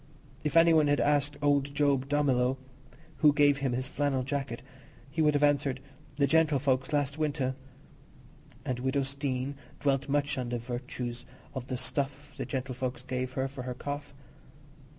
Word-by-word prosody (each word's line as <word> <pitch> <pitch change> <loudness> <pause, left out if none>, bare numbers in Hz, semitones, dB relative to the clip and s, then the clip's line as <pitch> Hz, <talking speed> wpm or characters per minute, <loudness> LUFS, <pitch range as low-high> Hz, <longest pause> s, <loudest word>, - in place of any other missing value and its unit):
If 155 +2 +1
any 165 0 +7
one 155 -2 +5
had 145 0 +3
asked 145 0 +2
old 140 -1 +2
Job 140 -2 +2
Dummilow 135 -3 +2 0.6
who 150 0 +6
gave 145 -1 +4
him 135 -3 0
his 130 +2 -2
flannel 140 -2 0
jacket, 135 -3 -3 0.5
he 160 - 0
would 150 -1 +4
have 145 - +2
answered, 140 -2 +2 0.4
"the 140 0 +3
gentlefolks, 140 -3 +2
last 145 0 0
winter"; 140 -4 0 1.1
and 130 -3 -2
widow 130 +2 +1
Steene 135 0 -2 0.3
dwelt 135 0 +1
much 145 0 +1
on 125 -1 -3
the 120 - -1
virtues 120 0 -5 0.3
of 130 -2 -5
the 130 - -2
"stuff" 140 +2 -2
the - - -4
gentlefolks 130 -2 -3
gave 130 0 -3
her 130 0 0
for 135 -1 -7
her 125 0 -4
cough. 145 +2 -5
140 Hz, 160 wpm, -30 LUFS, 130-145 Hz, 1.1 s, any